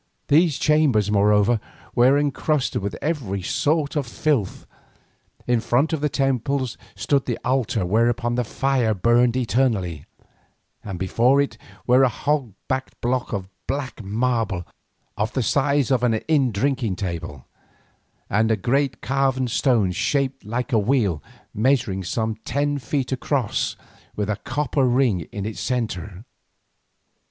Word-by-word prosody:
These 155 0 +4
chambers, 135 -10 +3
moreover, 105 +2 +3 0.3
were 130 +4 +5
encrusted 145 -2 0
with 100 -2 -4
every 125 - -2
sort 150 - 0
of 145 -4 -1
filth. 120 -5 -1 0.8
In 120 -1 +2
front 135 +8 +1
of 155 - -1
the 150 - +1
temples 135 -1 0 0.2
stood 135 +8 0
the 120 - -1
altar 125 -5 0
whereon 120 +4 +1
the 125 0 0
fire 125 -2 0
burned 120 +4 +3
eternally, 110 - 0 0.8
and 95 -4 -5
before 120 +9 +2
it 140 - 0 0.3
were 125 +2 +5
a 130 - +5
hog 130 -3 -1
backed 130 0 -3
block 125 +1 -1
of 100 -4 -3 0.2
black 135 -4 -4
marble 110 -3 -1 0.5
of 105 +3 -1
the 130 - 0
size 140 +2 +1
of 130 -2 +3
an 120 -2 +2
inn 135 +1 +1
drinking 120 -1 0
table, 85 -7 -5 0.8
and 110 +3 +2
a 110 - +2
great 135 +7 0
carven 135 -1 +1
stone 115 -5 +2
shaped 135 +7 -1
like 120 +5 -3
a 110 - +5
wheel, 105 - +1 0.3
measuring 115 -5 +1
some 110 +4 -2
ten 145 0 -1
feet 135 +1 -2
across 130 -3 -1 0.4
with 105 0 -1
a 105 - -2
copper 135 +4 -1
ring 120 - +1
in 100 -1 -4
its 110 - -5
centre. 105 -5 -3
120 Hz, 140 wpm, -23 LUFS, 105-135 Hz, 0.8 s, were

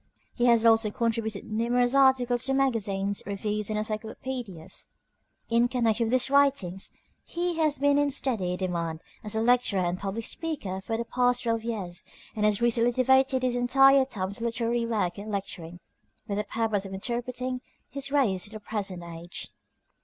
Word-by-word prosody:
He 240 - 0
has 235 -1 +5
also 225 -1 +5
contributed 220 -2 -2
numerous 240 +3 +1
articles 255 -3 +3
to 270 - +1
magazines, 205 -7 0
reviews, 210 +1 -2
and 215 - -1
encyclopedias. 215 -3 -5 0.6
In 235 +1 +3
connection 235 -2 +1
with 230 - -2
his 255 +1 +2
writings 275 -10 +2 0.3
he 345 0 -2
has 310 -3 +2
been 285 +1 +3
in 290 0 +2
steady 220 -10 0
demand 170 -3 -3 0.2
as 210 0 -4
a 220 - +1
lecturer 235 -5 +3
and 175 +1 -1
public 200 +3 -4
speaker 260 - -4
for 225 +3 -3
the 235 - -3
past 245 +1 +1
twelve 230 -1 0
years, 200 -7 -4 0.3
and 210 -1 +1
has 210 +2 +1
recently 235 0 +3
devoted 265 +1 +3
his 250 -1 +1
entire 270 +2 +5
time 195 -7 -3
to 215 +3 -6
literary 235 0 0
work 200 -5 -1
and 210 +1 -6
lecturing, 175 -4 -5 0.5
with 205 0 -2
the 210 - -2
purpose 220 -3 -1
of 195 -1 -7
interpreting 250 +4 -3 0.3
his 275 0 -5
race 225 -11 +2
to - - -7
the 215 0 -8
present 200 -4 -4
age. 170 +1 -6
230 Hz, 170 wpm, -27 LUFS, 200-255 Hz, 0.6 s, has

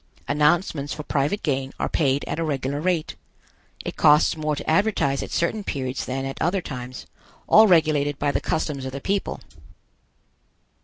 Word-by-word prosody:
Announcements 150 0 +1
for 150 - -6
private 150 +8 -1
gain 135 -2 -1
are - - 0
paid 140 -2 +1
at - - -4
a - - 0
regular 140 -1 -2
rate. 175 -2 -1 0.7
It - - -5
costs 150 +1 +5
more 155 -1 -1
to 145 - -7
advertise 160 -6 +2
at - - -6
certain 205 +5 -1
periods 130 -6 -3
than 135 +1 -3
at 135 - -6
other 180 +4 +1
times, 125 -3 -7 0.4
all 220 +1 +7
regulated 155 -5 +3
by 145 0 0
the - - -1
customs 150 -4 -2
of 130 0 -5
the 140 - -4
people. 195 +7 -2
150 Hz, 165 wpm, -24 LUFS, 135-165 Hz, 0.7 s, all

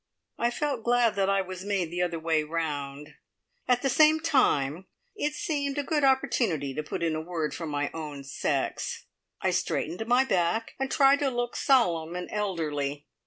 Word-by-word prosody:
I 235 - +2
felt 270 -2 -2
glad 240 -1 +3
that 195 -1 +1
I 195 0 +3
was 185 0 -7
made 195 -5 -1
the 175 +1 -2
other 175 -2 0
way 160 -1 +1
round. 150 -3 -4 0.5
At 250 +1 +2
the - - +2
same 310 +4 +5
time 190 - +1 0.3
it 295 0 -1
seemed 290 -8 -2
a 290 - 0
good 295 +1 0
opportunity 215 - +1
to 155 - -2
put 155 - -5
in 165 -1 +1
a 155 - -2
word 160 -2 -3
for 165 - -5
my 145 -1 -2
own 150 -3 -6
sex. 135 - -2 0.4
I - - +2
straightened 180 +8 -2
my 250 +2 +4
back, 190 0 0
and 270 0 -1
tried 275 0 +5
to 285 - +1
look 240 -1 -2
solemn 175 - +2
and 180 0 -5
elderly. 150 -8 -2
185 Hz, 180 wpm, -28 LUFS, 160-260 Hz, 0.5 s, same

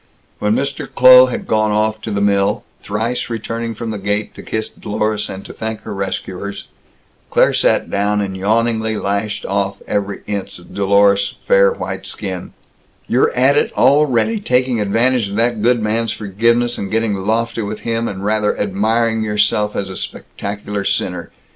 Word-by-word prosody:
When 105 +1 +1
Mr. 140 +2 -3
Kloh 130 0 +8
had 125 - -4
gone 110 0 +1
off 110 +1 0
to 110 - -5
the 100 -1 -1
mill 100 -1 +2 0.2
thrice 110 +5 -2
returning 115 0 -4
from 115 +1 -4
the 105 - -4
gate 100 +2 -2
to - - -10
kiss 110 0 -3
Dlorus 105 0 -2
and 95 +1 -7
to - - -9
thank 110 0 -5
her - - -6
rescuers 100 0 -4 0.7
Claire - - +3
sat - - +2
down 100 +1 +1
and 95 -2 -2
yawningly 110 +2 0
lashed 100 +1 -2
off 100 0 -1
every 100 -1 -2
inch 100 -2 -4
of 90 - -15
Dlorus's 100 0 +3
fair - - +5
white 475 - -5
skin: - - -5 0.5
"You're 450 - +2
at - - +4
it 450 +1 +2
already; 145 - +3
taking 125 - +1
advantage 115 +2 +1
of 100 - -5
that 115 0 +1
good 120 0 +2
man's 110 +1 0
forgiveness, 115 +4 0
and 100 - -4
getting 110 0 0
lofty 115 +4 -1
with 105 0 -5
him, 115 0 -1
and 100 -1 -5
rather 105 0 +1
admiring 110 +3 +1
yourself 105 0 +1
as 95 -1 -2
a - - -7
spectacular 100 +2 -5
sinner. 90 -2 -1
110 Hz, 165 wpm, -18 LUFS, 100-115 Hz, 0.7 s, Kloh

